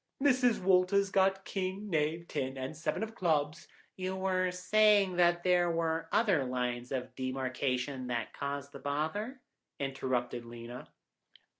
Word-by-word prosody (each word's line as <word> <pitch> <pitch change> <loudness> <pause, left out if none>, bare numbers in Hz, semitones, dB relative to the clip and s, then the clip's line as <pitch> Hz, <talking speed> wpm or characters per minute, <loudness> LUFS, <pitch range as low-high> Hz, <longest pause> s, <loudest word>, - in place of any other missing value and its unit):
Mrs. 255 -4 +3
Walters 190 +1 +3
had - - -20
got 195 0 +3
king, 195 +2 -3
knave, 165 -1 0
ten, 130 0 -3
and 130 +3 -4
seven 160 +7 -2
of 220 0 -5
clubs—" 155 -6 0 0.3
"You 185 0 -3
were 185 -1 +1
saying 200 +1 +3
that 175 0 +4
there 180 -1 +3
were 165 -1 -1
other 195 -11 +3
lines 125 -1 -2
of 130 -2 -3
demarcation 130 0 -2
that 120 -2 -3
caused 140 0 -4
the - - -9
bother," 160 - -2 0.4
interrupted 130 -3 -2
Lena. 120 +1 -9
165 Hz, 140 wpm, -32 LUFS, 130-190 Hz, 0.4 s, that